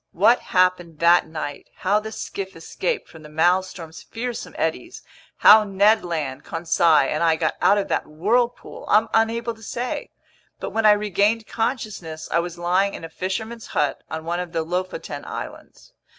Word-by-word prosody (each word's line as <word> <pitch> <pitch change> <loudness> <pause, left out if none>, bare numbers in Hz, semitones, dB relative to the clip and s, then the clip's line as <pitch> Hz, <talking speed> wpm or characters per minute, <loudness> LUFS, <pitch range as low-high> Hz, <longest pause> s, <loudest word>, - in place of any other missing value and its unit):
What 220 +8 +4
happened 180 -3 +1
that 170 +2 +4
night, 155 -2 -6
how 200 +3 +1
the 220 +1 -7
skiff 195 -3 -6
escaped 445 - -3
from 160 - -14
the 150 - -12
Maelstrom's 170 +1 0
fearsome 240 +1 -6
eddies, - - -3 0.3
how 215 +1 +8
Ned 205 +2 +3
Land, 150 -6 -3
Conseil, 165 -3 +3
and 155 - -2
I 165 -1 +4
got 160 0 0
out 205 - +5
of 200 - -1
that - - -1
whirlpool, 220 +11 -1
I'm 215 +2 +4
unable 230 +1 +1
to 220 - -19
say. 245 +3 -4 0.5
But - - -5
when 225 -1 +2
I - - +9
regained 210 +2 +1
consciousness, 215 -10 -3
I 170 - +3
was 175 0 -4
lying 185 +3 +1
in - - -9
a 165 - -6
fisherman's 220 +7 -4
hut 145 - -1
on 160 0 -5
one 170 +1 -2
of 180 -1 -5
the 165 -1 0
Lofoten 180 +3 -4
Islands. - - -9
185 Hz, 170 wpm, -23 LUFS, 165-220 Hz, 0.5 s, I